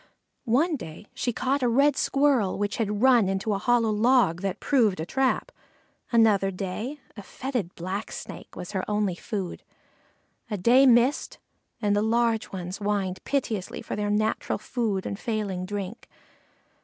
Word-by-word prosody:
One 300 +7 +3
day 165 -2 -9
she 245 - -1
caught 260 +4 0
a 250 - +2
Red 280 +5 +4
squirrel 275 -8 +2
which 205 0 -2
had 210 0 -1
run 245 -7 +5
into 195 +2 -1
a 195 - -1
hollow 230 0 +2
log 215 -5 +3
that 195 0 -2
proved 225 - +2
a 160 - -2
trap. 265 +7 0 0.6
Another 215 -4 +4
day 200 +9 -5 0.2
a 210 - -8
fetid 235 -3 -4
Blacksnake 190 +5 -6
was 180 - -7
her 190 -2 -2
only 210 -3 +1
food. 190 0 -5 0.9
A 210 - -2
day 250 +8 +5
was 245 - +8
missed, 245 +4 +1 0.5
and 205 -1 +2
the 205 - +2
little 230 0 +1
ones 180 0 -5
whined 200 -3 -2
piteously 225 -9 -2
for - - -4
their 205 0 -1
natural 215 +1 0
food 215 -7 -2
and 200 - -4
failing 200 -5 -3
drink. 205 +1 -6
210 Hz, 155 wpm, -26 LUFS, 195-245 Hz, 0.9 s, was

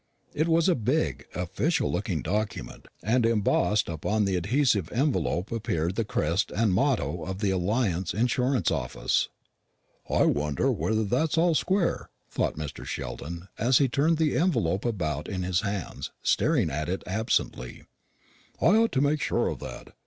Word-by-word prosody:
It 155 +2 +1
was 165 +1 +3
a 185 - +5
big, 110 - -1
official - - 0
looking - - -2
document, 105 0 -3 0.2
and 120 +3 +2
embossed 105 -2 +2
upon 105 +6 0
the 95 -1 0
adhesive 105 - +1
envelope 105 - 0
appeared 90 -7 -1
the 115 - 0
crest 85 -2 0
and 110 -3 +1
motto 120 - +1
of 95 0 -4
the 100 -1 0
Alliance 95 -2 0
Insurance 125 -1 +1
Office. 70 -6 0 0.8
"I - - +3
wonder 75 -1 +1
whether 110 0 0
that's 135 +10 0
all 170 +1 +4
square," 185 +2 0 0.2
thought - - -1
Mr. 75 -2 -6
Sheldon, 85 +4 -6
as 125 +3 +4
he 140 - +4
turned 150 +6 +2
the 160 -2 +1
envelope 100 - +1
about 80 - -2
in 95 -2 -3
his 90 -1 +1
hands, 100 -3 -4
staring 125 - +2
at 75 +4 -3
it 95 - -2
absently. 95 - -2 0.8
"I 170 - +4
ought 230 0 +3
to 130 - +2
make 145 +1 +2
sure - - +1
of - - -5
that. - - -9
105 Hz, 155 wpm, -27 LUFS, 90-135 Hz, 0.8 s, a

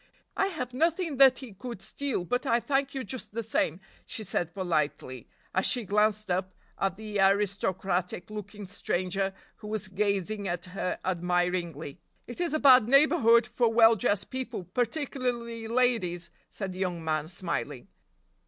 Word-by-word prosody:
"I 390 - +2
have 255 -10 -5
nothing 325 +1 0
that 265 -1 +7
he 255 -6 -9
could 235 +2 -7
steal, 240 -1 -2
but 245 - -1
I 235 -1 +3
thank 275 +3 -1
you 265 - -2
just 220 -2 -6
the 230 - -2
same," 180 -6 0 0.3
she 220 - -5
said 175 -3 -2
politely, 155 - -2 0.3
as 190 - +2
she 245 -3 +1
glanced 210 0 +1
up 185 +1 -1 0.2
at 195 -1 0
the 215 -2 -4
aristocratic 195 -2 +1
looking 210 -1 -7
stranger 190 0 -1 0.3
who 210 - -10
was 210 -2 -2
gazing 200 +1 -1
at 175 -1 -3
her 185 -2 -2
admiringly. 175 -4 -1 0.3
"It 240 +8 -6
is 345 - 0
a - - +1
bad 255 -5 +7
neighborhood 275 -4 +5
for 240 -1 +1
well 225 0 +6
dressed 205 -1 0
people, 260 -7 -4
particularly 240 - -2
ladies," 225 -8 +1 0.2
said 195 -3 -5
the 185 - -9
young 180 -3 -2
man, 155 -1 0
smiling. 170 -7 -4
210 Hz, 155 wpm, -28 LUFS, 180-245 Hz, 0.3 s, that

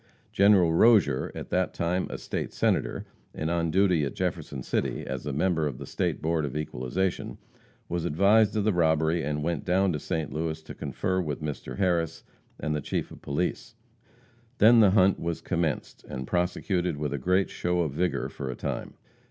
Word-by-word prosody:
General 100 -4 +5
Rozier, 105 - +4
at - - -7
that 90 0 0
time 90 +2 0
a - - -5
State - - -4
Senator, - - 0 0.3
and 80 +2 -2
on 85 -1 0
duty 90 -2 +3
at 70 - -3
Jefferson 65 - -3
City, - - -2
as 65 +1 -5
a - - -1
member 80 +2 +1
of 70 -4 -5
the - - -7
State - - -2
Board 80 0 +1
of 70 0 -3
Equalization, 75 +6 -2 0.5
was 85 -1 -2
advised 100 +6 +4
of 105 - +1
the 110 0 +2
robbery, 80 -1 +2
and 75 +1 -2
went 85 -2 -1
down 95 +1 +2
to 75 - -2
St. 80 +1 -3
Louis 80 0 -2
to - - -9
confer 95 +7 -2
with 75 -2 -4
Mr. 75 -2 -5
Harris 85 -4 0 0.4
and 75 -1 -1
the 75 - -2
Chief - - -3
of - - -12
Police. 75 +6 -3 0.8
Then 115 +2 +7
the 105 -3 +7
hunt 95 0 +4
was 85 0 -2
commenced, 85 -5 -2
and 65 0 -5
prosecuted 90 0 -1
with 75 -1 -2
a 70 - -2
great 90 +6 +1
show 90 0 0
of 80 -4 -1
vigor 90 +5 -1
for 65 - -6
a 65 - -4
time. - - -4
85 Hz, 185 wpm, -27 LUFS, 75-95 Hz, 0.8 s, Then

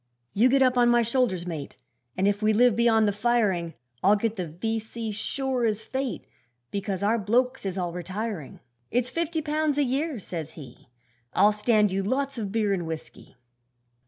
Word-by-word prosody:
'You 230 +6 +4
get 270 +1 +4
up 255 -1 +3
on 240 0 +5
my 240 0 +4
shoulders, 230 -7 0
mate, 160 -5 -6 0.4
And 190 - +2
if 205 +1 +1
we 215 0 +3
live 240 0 +4
beyond 225 -2 +4
the - - +3
firing, 205 -6 0 0.3
I'll 200 +3 +6
get 220 +1 -1
the 180 -4 -3
V.C. 220 +6 -4
sure 255 +4 -2
as 220 -1 0
fate, 265 0 -3 0.5
Because 200 -1 -3
our 225 +3 +2
blokes 245 +3 +1
is 190 0 -3
all 175 -2 -2
retiring. 185 -2 -5 0.3
'It's 245 +1 0
fifty 330 +1 -1
pounds 300 -1 0
a 290 - +4
year,' 275 +1 -1
says 160 -5 -6
he, 130 -7 -12 0.5
'I'll 205 +3 +5
stand 210 -1 +2
you 195 +1 0
lots 265 +5 -1
of 205 -3 -3
beer 215 -2 +1
and 175 -4 -2
whisky.' 160 -4 -8
220 Hz, 180 wpm, -26 LUFS, 195-250 Hz, 0.5 s, I'll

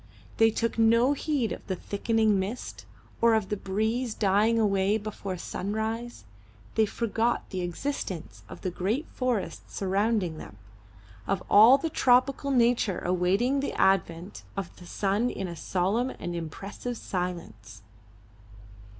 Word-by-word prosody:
They 225 0 +6
took 230 +1 -2
no 230 +4 +5
heed 285 -5 -1
of - - -5 0.2
thickening 215 0 +1
mist, 200 +6 -5 0.3
or 230 -1 +5
of 215 -3 -1
the 210 - 0
breeze 220 +5 -1
dying 210 +3 +3
away 200 -1 +2
before 200 -3 -5
sunrise; 220 - -4 0.5
they 220 -1 +3
forgot 230 +2 -1
the 185 - -2
existence 175 - -4
of - - -10
the 185 - -2
great 210 - -1
forests 250 -6 -2
surrounding 195 -3 0
them, 100 - -11 0.7
of 195 -2 -1
all 225 +6 +9
the 320 +3 -3
tropical 255 +2 +3
nature 240 -6 +2
awaiting 185 +9 +2
the 280 - -2
advent 180 -1 +1 0.2
of 195 -3 -5
the 175 - -13
sun 205 +6 0
in 195 - -4
a 170 - -6
solemn 195 +9 0
and 175 -8 -6
impressive 195 +8 -5
silence. 110 - -5
210 Hz, 135 wpm, -27 LUFS, 185-235 Hz, 0.7 s, all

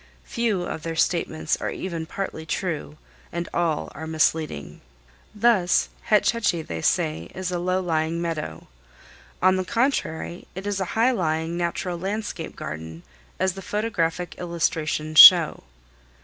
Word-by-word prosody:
Few 225 -6 -1
of 160 - -5
their 165 0 -4
statements 160 -2 0
are - - -1
even 165 -3 -5
partly 180 -3 -5
true, 155 -2 -3 0.3
and 170 0 -3
all 165 -3 -1
are 160 +2 -7
misleading. 155 - -1 0.5
Thus, 210 -5 +3 0.2
Hetch 210 -1 +4
Hetchy, 210 -8 0
they 80 - -5
say, 80 +2 0
is 185 -1 -3
a 175 - -1
"low 185 +1 0
lying 165 -1 -1
meadow." 165 -3 -4 0.8
On 185 0 +5
the 185 - 0
contrary, 185 - -1
it 190 +2 -6
is 205 -1 -1
a 190 - -1
high 235 +3 +4
lying 160 -5 -1
natural 175 0 -2
landscape 195 -3 -4
garden, 80 +2 -7 0.4
as 190 0 +1
the 195 - -8
photographic 180 -5 -2
illustrations 155 -2 0
show. 170 - +9
170 Hz, 140 wpm, -24 LUFS, 160-190 Hz, 0.8 s, show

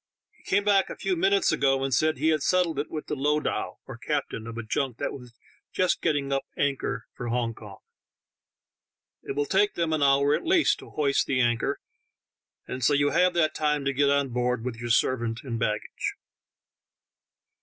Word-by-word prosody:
He - - -25
came 200 +1 +2
back 200 -2 +3
a - - -6
few 375 - -1
minutes 385 +1 +3
ago, 135 -1 +2
and 135 -1 -1
said 155 +5 +2
he 160 - +1
had 155 -2 +2
settled 175 -3 +1
it 145 - -3
with 155 - -5
the 150 - -3
lowdah 150 +2 -1 0.3
(captain) 110 0 -3
of 115 0 -7
a 115 - -4
junk 120 +2 -2
that - - -3
was 125 -3 -10 0.4
just 185 -1 +1
getting 140 -2 0
up 135 - +1 0.2
anchor 140 -1 -1
for 120 - -6
Hong 120 -1 -1
Kong. - - -12 1.4
It - - -5
will 145 0 0
take 200 +5 +2
them 165 -2 0
an 155 - 0
hour 140 +1 +4
at - - 0
least 345 -1 +3
to - - -12
hoist 140 -2 +1
the 130 - +1
anchor, 120 +3 +1 0.9
and 125 0 -5
so 145 - +4
you 145 0 +2
have 180 -1 +3
that 155 -3 +2
time 150 -2 0
to 140 - +1
get 140 +1 +2
on 140 -1 +2
board 125 -1 -1
with 125 -2 -4
your 120 0 -5
servant 115 -1 +1
and 120 -4 -4
baggage." 105 -3 -2
140 Hz, 190 wpm, -26 LUFS, 125-155 Hz, 1.4 s, hour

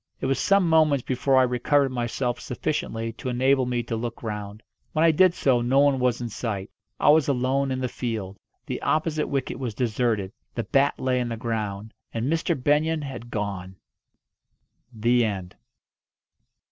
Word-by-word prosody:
It - - -3
was 135 -1 +1
some 195 +1 +3
moments 155 -5 +4
before 130 +1 +2
I 130 - +6
recovered 135 +3 +2
myself 120 0 -2
sufficiently 115 0 -3
to 125 - -5
enable 130 +1 +2
me 120 -1 -1
to 115 - -3
look 115 +1 -5
round. 105 -1 -5 0.3
When 155 +1 +3
I 165 - +6
did 180 +3 +4
so 125 -3 +2
no 125 +3 +1
one 140 -1 +4
was 125 -2 +1
in 120 - -2
sight. 105 -3 -4 0.3
I - - +4
was 155 -1 +5
alone 135 +1 +1
in 130 - -1
the 130 - 0
field. 110 -6 -4 0.3
The - - -4
opposite 155 -1 0
wicket 135 -2 -2
was 120 -5 -4
deserted. 110 -5 0 0.2
The 115 - -1
bat 140 +4 +2
lay 130 -1 +1
on 120 - -2
the 115 - -4
ground. 110 -2 -4 0.2
And 115 +1 -1
Mr. 165 0 0
Benyon 150 +3 +1
had 125 -4 -7
gone! 95 -4 -4 1.2
THE 120 +1 +2
END. 95 -5 -3
125 Hz, 170 wpm, -25 LUFS, 115-140 Hz, 1.2 s, I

